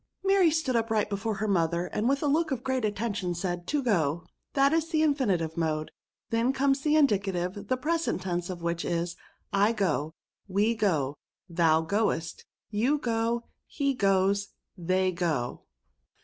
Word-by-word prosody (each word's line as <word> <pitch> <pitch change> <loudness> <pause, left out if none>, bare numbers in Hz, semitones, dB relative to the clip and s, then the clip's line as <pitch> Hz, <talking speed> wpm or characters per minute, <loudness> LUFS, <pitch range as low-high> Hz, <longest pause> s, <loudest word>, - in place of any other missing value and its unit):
Mary 390 -3 +5
stood 300 -5 0
upright 220 -2 +1
before 205 +2 -2
her 215 +2 -2
mother, 170 -2 +1
and, 210 +6 -1
with 275 +1 +1
a - - +2
look 315 +3 +2
of 260 -4 -3
great 260 -2 -1
attention, 205 -4 -2
said, 175 0 -3
To 295 -2 0
go. 170 - +1 0.3
That 275 +1 +4
is 325 0 +1
the 315 -2 +2
infinitive 200 - +1
mode. 155 -2 -1 0.4
Then 230 +3 +2
comes 270 0 +2
the 300 +1 +2
indicative, 195 - +1
the 255 - +1
present 320 - -1
tense 175 -1 -2
of 175 -2 -6
which 170 0 -1
is, 170 0 -2 0.2
" - - -39 0.2
I - - 0
go. 160 -7 -1 0.3
We 205 +4 +2
go. 155 -11 0 0.3
Thou 165 -2 +3
goest. 165 -2 -1 0.3
You 240 +8 +2
go. 230 -2 -1 0.2
He 280 -1 0
goes. 200 -2 +2 0.3
They 185 +1 +1
go. 160 -9 -2
205 Hz, 165 wpm, -28 LUFS, 175-260 Hz, 0.4 s, Mary